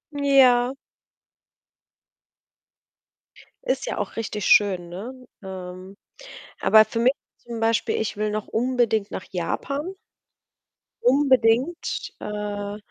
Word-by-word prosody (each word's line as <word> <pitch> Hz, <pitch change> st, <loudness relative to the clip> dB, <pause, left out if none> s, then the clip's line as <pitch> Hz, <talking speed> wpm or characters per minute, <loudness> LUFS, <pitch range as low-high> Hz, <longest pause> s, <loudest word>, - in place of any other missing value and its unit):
Ja. 265 Hz, -3 st, +4 dB, 2.9 s
Ist -, -, -1 dB
ja -, -, -4 dB
auch -, -, -4 dB
richtig 210 Hz, -2 st, -3 dB
schön, 185 Hz, -4 st, +4 dB
ne? 200 Hz, +9 st, -7 dB, 0.3 s
Ähm, 185 Hz, 0 st, -9 dB, 0.7 s
aber 220 Hz, 0 st, +6 dB
für 230 Hz, +2 st, -5 dB
mich, 250 Hz, +3 st, +4 dB, 0.3 s
zum 235 Hz, -1 st, -8 dB
Beispiel 225 Hz, 0 st, +1 dB
ich 220 Hz, -, -3 dB
will 210 Hz, 0 st, -1 dB
noch 215 Hz, 0 st, -4 dB
unbedingt 230 Hz, -3 st, 0 dB
nach 190 Hz, -, -5 dB
Japan. 280 Hz, -, -3 dB, 1.1 s
Unbedingt, 260 Hz, +3 st, +2 dB
äh, 205 Hz, -1 st, -5 dB
225 Hz, 100 wpm, -24 LUFS, 205-255 Hz, 2.9 s, aber